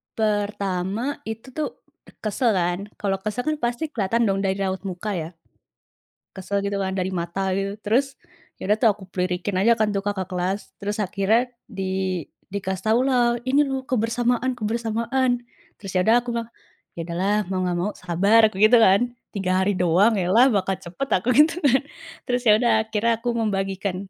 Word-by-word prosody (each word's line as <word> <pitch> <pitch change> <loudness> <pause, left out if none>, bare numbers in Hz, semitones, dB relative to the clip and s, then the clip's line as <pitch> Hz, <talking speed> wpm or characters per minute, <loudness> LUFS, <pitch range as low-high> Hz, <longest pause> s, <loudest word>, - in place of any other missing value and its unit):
Pertama 205 +2 -1
itu 225 +3 -6
tuh 305 +3 -2 0.5
kesel 220 +1 +1
kan, 175 0 0 0.2
kalau 195 -2 -2
kesel 215 +5 -3
kan 310 +2 -1
pasti 245 +6 -2
kelihatan 230 -1 0
dong 195 -2 +1
dari 195 -1 0
raut 190 -1 -2
muka 185 +3 -4
ya. 165 -3 -3 1.1
Kesel 200 +1 -2
gitu 200 0 -2
kan 190 -1 -2
dari 190 -1 -1
mata, 185 +2 -2
gitu. 195 0 -2
Terus 265 +6 +1 0.5
ya 200 - -4
udah 215 - +4
tuh 235 - +4
aku 205 - -17 0.2
lirikin 180 +1 -1
aja 220 +5 +5
kan 215 -2 +1
tuh 200 -1 -2
kakak 195 -3 -3
kelas. 185 +2 -1 0.2
Terus 205 +1 -3
akhirnya 210 +6 +1 0.2
di 190 -3 -2 0.3
dikasih 190 -1 -4
tahulah, 240 +1 +3
"Ini 270 +3 +3
loh 270 -1 -2
kebersamaan 245 0 0
kebersamaan!" 235 +3 0 0.4
Terus 195 -3 -7
ya 185 - +3
udah 225 - +6
aku 245 - -5
mah, 230 - -4 0.5
"Ya 170 - -3
udahlah, 185 +4 0
mau 190 - -1
nggak 175 -1 -1
mau 190 +4 -1
sabar," 200 +6 +4
aku 215 -3 -5
gitu 235 +3 +7
kan. 195 -3 +6 0.3
3 185 -1 +1
hari 205 - +2
doang 180 +6 +4
elah 190 +8 +4
bakal 195 -3 +1
cepet, 190 +9 -6
aku 190 +6 0
gitu 305 +2 +6
kan. 270 -1 +4 0.4
Terus 250 -1 0
ya 215 - +8
udah 235 +1 +3
akhirnya 220 +1 +1
aku 245 - -2
membagikan 195 -3 -1
205 Hz, 175 wpm, -23 LUFS, 190-235 Hz, 1.1 s, ya